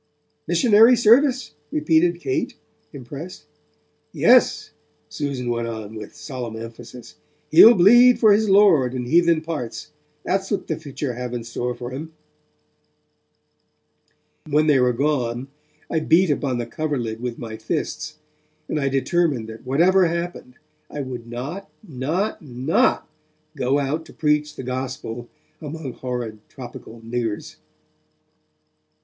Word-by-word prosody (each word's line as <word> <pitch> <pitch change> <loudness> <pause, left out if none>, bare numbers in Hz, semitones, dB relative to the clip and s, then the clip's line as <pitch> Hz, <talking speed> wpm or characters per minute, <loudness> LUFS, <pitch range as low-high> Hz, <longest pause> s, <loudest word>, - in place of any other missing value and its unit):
'Missionary 230 0 +5
service?' 250 - +3 0.2
repeated 160 +3 +2
Kate, 135 -5 -2 0.4
impressed. 140 +6 -9 0.7
'Yes,' - - +3 0.4
Susan 140 -4 -4
went 115 0 -2
on, 110 -2 -6
with 105 -2 -9
solemn 125 -5 -6
emphasis, 115 +2 -10 0.3
'he'll 225 +9 +9
bleed 240 +7 +7
for 215 -3 +5
his 215 0 +2
Lord 175 -11 +5
in 125 -1 -3
heathen 170 +3 +3
parts, 155 -8 -6 0.3
that's 195 +1 -1
what 205 - -2
the 160 - -2
future 145 -4 -5
have 125 0 -5
in 120 - -4
store 120 +1 -4
for 125 +1 -7
'im.' 160 +4 -7 2.4
When 150 +1 +3
they 150 -3 +4
were 125 0 +3
gone, 125 -1 -1 0.4
I 160 - 0
beat 165 +2 +3
upon 135 -3 -1
the 120 - -3
coverlid 120 -5 -3
with 125 -1 -4
my 110 -2 -7
fists, 155 +6 -4 0.5
and 150 - -2
I 140 -1 0
determined 135 -3 0
that 110 +3 -11
whatever 175 +7 +4
happened, 170 -6 -5 0.3
I 150 - -5
would 125 -3 -7
not, 135 +12 -6 0.2
not, 160 +9 -2
not, 130 0 0 0.5
go 135 0 +1
out 145 +3 -2
to - - -14
preach 150 -1 0
the - - -7
Gospel 125 -2 -5 0.3
among 150 -3 -6
horrid, 120 -4 -5
tropical 120 -2 -11
niggers. 115 -2 -4
140 Hz, 130 wpm, -22 LUFS, 120-165 Hz, 2.4 s, he'll